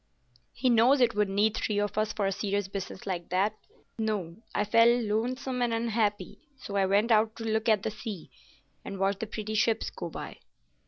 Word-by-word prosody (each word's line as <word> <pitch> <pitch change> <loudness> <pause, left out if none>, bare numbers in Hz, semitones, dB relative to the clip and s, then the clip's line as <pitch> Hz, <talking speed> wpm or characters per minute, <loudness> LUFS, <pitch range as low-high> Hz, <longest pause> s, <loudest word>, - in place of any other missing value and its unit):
"He 255 0 +2
knows 240 +5 +5
it 245 - +4
would 210 -1 +1
need 205 +2 +2
three 210 - -1
of 205 0 -1
us 215 0 0
for 205 - -1
a 195 - +1
serious 200 0 -1
business 190 -1 -6
like 175 -3 -4
that. 195 +4 +1 0.4
No, 200 -6 -2 0.2
I 210 - +1
felt 230 +3 +5
lonesome 250 +4 -1
and 240 -1 +1
unhappy, 225 -2 -1 0.2
so 205 -6 -7
I 195 -1 +3
went 205 +4 +2
out 220 0 +3
to 230 - -7
look 220 +1 0
at 215 -3 +3
the 220 - -1
sea, 210 -4 -7 0.5
and 195 - -6
watch 195 +1 0
the 225 - -3
pretty 215 0 -5
ships 220 +1 +1
go - - -6
by." - - -7
215 Hz, 200 wpm, -29 LUFS, 200-230 Hz, 0.5 s, knows